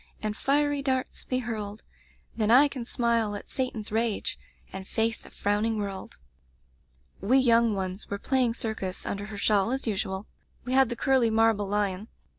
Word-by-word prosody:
And 215 Hz, 0 st, -1 dB
fiery 290 Hz, +3 st, +1 dB
darts 260 Hz, -2 st, -2 dB
be 255 Hz, -, -1 dB
hurled, 215 Hz, -4 st, -4 dB, 0.5 s
Then 215 Hz, -2 st, 0 dB
I 265 Hz, +5 st, +7 dB
can 260 Hz, -4 st, -6 dB
smile 230 Hz, -3 st, 0 dB
at 205 Hz, -, -9 dB
Satan's 245 Hz, -6 st, -3 dB
rage, 225 Hz, -1 st, -1 dB, 0.3 s
And 190 Hz, 0 st, -6 dB
face 225 Hz, 0 st, -1 dB
a -, -, -12 dB
frowning 210 Hz, +2 st, 0 dB
world/ 195 Hz, -2 st, -5 dB, 1.0 s
"We 230 Hz, +8 st, +3 dB
young 235 Hz, -4 st, +4 dB
ones 190 Hz, +1 st, -4 dB
were 200 Hz, -, -2 dB
playing 250 Hz, +1 st, +1 dB
circus 220 Hz, -6 st, -3 dB
un -, -, -2 dB
der 200 Hz, -, -6 dB
her 210 Hz, -1 st, -8 dB
shawl, 200 Hz, 0 st, +2 dB
as 265 Hz, +2 st, -1 dB
usual. 190 Hz, -2 st, -2 dB, 0.4 s
We 250 Hz, -, -2 dB
had 265 Hz, -2 st, +5 dB
the 240 Hz, -, -2 dB
curly 260 Hz, -2 st, +3 dB
marble 220 Hz, -2 st, +3 dB
lion. 205 Hz, 0 st, -1 dB
225 Hz, 170 wpm, -27 LUFS, 205-250 Hz, 1.0 s, I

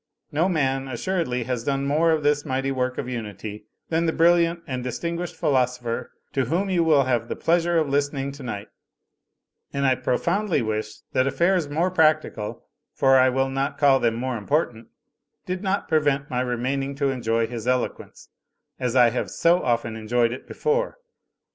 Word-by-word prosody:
No 165 Hz, +6 st, +2 dB
man 135 Hz, -5 st, 0 dB
assuredly 130 Hz, -1 st, -2 dB
has 125 Hz, -1 st, -3 dB
done 140 Hz, +1 st, -1 dB
more 155 Hz, +4 st, +2 dB
of 160 Hz, -2 st, +2 dB
this 145 Hz, 0 st, +2 dB
mighty 135 Hz, -1 st, -1 dB
work 130 Hz, -1 st, -1 dB
of -, -, -3 dB
unity 105 Hz, -3 st, -6 dB, 0.2 s
than 165 Hz, +1 st, +1 dB
the -, -, +3 dB
brilliant 170 Hz, 0 st, +3 dB
and 130 Hz, -4 st, -4 dB
distinguished 170 Hz, +7 st, -4 dB
philosopher 125 Hz, -3 st, 0 dB, 0.2 s
to 135 Hz, -2 st, +1 dB
whom 180 Hz, +9 st, 0 dB
you 175 Hz, -2 st, +3 dB
will 155 Hz, -4 st, +4 dB
have 125 Hz, -3 st, 0 dB
the -, -, -3 dB
pleasure 170 Hz, 0 st, +2 dB
of 155 Hz, -2 st, +2 dB
listening 140 Hz, 0 st, -1 dB
tonight; 115 Hz, -7 st, -6 dB, 1.0 s
and 140 Hz, 0 st, -1 dB
I 130 Hz, -, +5 dB
profoimdly 155 Hz, -, 0 dB
wish 110 Hz, 0 st, -3 dB
that 130 Hz, +1 st, +2 dB
affairs 170 Hz, +3 st, +1 dB
more 165 Hz, +5 st, 0 dB
practical, 155 Hz, -10 st, +1 dB, 0.3 s
for 135 Hz, 0 st, +5 dB
I 130 Hz, 0 st, +5 dB
will 135 Hz, +1 st, 0 dB
not 135 Hz, +1 st, -2 dB
call 140 Hz, -2 st, +5 dB
them 115 Hz, -2 st, +1 dB
more 125 Hz, +1 st, -2 dB
important, 115 Hz, -1 st, -1 dB, 0.6 s
did 185 Hz, 0 st, -3 dB
not 195 Hz, 0 st, -1 dB
prevent 145 Hz, -2 st, +1 dB
my 125 Hz, 0 st, 0 dB
remaining 130 Hz, +3 st, -2 dB
to 140 Hz, -1 st, 0 dB
enjoy 115 Hz, -3 st, 0 dB
his 120 Hz, 0 st, -6 dB
eloquence, 125 Hz, -1 st, -2 dB, 0.5 s
as 125 Hz, -1 st, -1 dB
I 120 Hz, -2 st, +6 dB
have 125 Hz, -, -2 dB
so 175 Hz, +2 st, +3 dB
often 115 Hz, -2 st, 0 dB
enjoyed 115 Hz, +2 st, +1 dB
it 125 Hz, -, -7 dB
before. -, -, -1 dB
135 Hz, 170 wpm, -24 LUFS, 125-160 Hz, 1.0 s, I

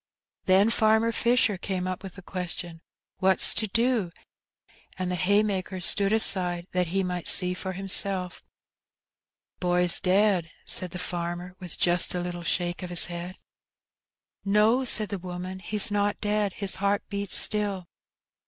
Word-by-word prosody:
Then 195 Hz, +4 st, +3 dB
Farmer 220 Hz, +1 st, +2 dB
Fisher 235 Hz, -4 st, +1 dB
came 185 Hz, -1 st, -4 dB
up 185 Hz, -1 st, -5 dB
with 190 Hz, -2 st, -10 dB
the 195 Hz, -, -13 dB
question, 175 Hz, -2 st, -6 dB, 0.4 s
"What's 190 Hz, -1 st, +3 dB
to 220 Hz, -, +2 dB
do?" 230 Hz, -2 st, 0 dB, 0.9 s
and 185 Hz, -1 st, -3 dB
the -, -, -2 dB
haymakers 190 Hz, -1 st, 0 dB
stood 200 Hz, -1 st, +4 dB
aside, 180 Hz, -5 st, +1 dB
that 180 Hz, -1 st, 0 dB
he 190 Hz, +3 st, -1 dB
might 180 Hz, -1 st, -4 dB
see 180 Hz, -1 st, +4 dB
for 185 Hz, +1 st, -6 dB
himself. 190 Hz, -1 st, +1 dB, 0.6 s
" -, -, -60 dB
The 180 Hz, -, -3 dB
boy^s 180 Hz, 0 st, +4 dB
dea^" 190 Hz, -2 st, +1 dB, 0.2 s
said 185 Hz, -, +3 dB
the 180 Hz, -, -8 dB
farmer, 175 Hz, 0 st, -5 dB
with 180 Hz, -3 st, -8 dB
just 175 Hz, +1 st, +2 dB
a -, -, -2 dB
little 175 Hz, 0 st, -6 dB
shake 175 Hz, +1 st, -2 dB
in 180 Hz, -, -7 dB
his 175 Hz, -1 st, +5 dB
voice. 175 Hz, +1 st, -7 dB, 1.1 s
"No," 210 Hz, +5 st, +2 dB
said 215 Hz, -3 st, +3 dB
the 200 Hz, -, -5 dB
woman, 180 Hz, +1 st, -7 dB
"he's 205 Hz, +2 st, 0 dB
not 205 Hz, 0 st, -1 dB
dead, 210 Hz, -2 st, -1 dB
his 200 Hz, -2 st, 0 dB
heart 200 Hz, 0 st, 0 dB
beats 200 Hz, -3 st, -1 dB
still." 200 Hz, -4 st, 0 dB
185 Hz, 155 wpm, -25 LUFS, 180-205 Hz, 1.1 s, his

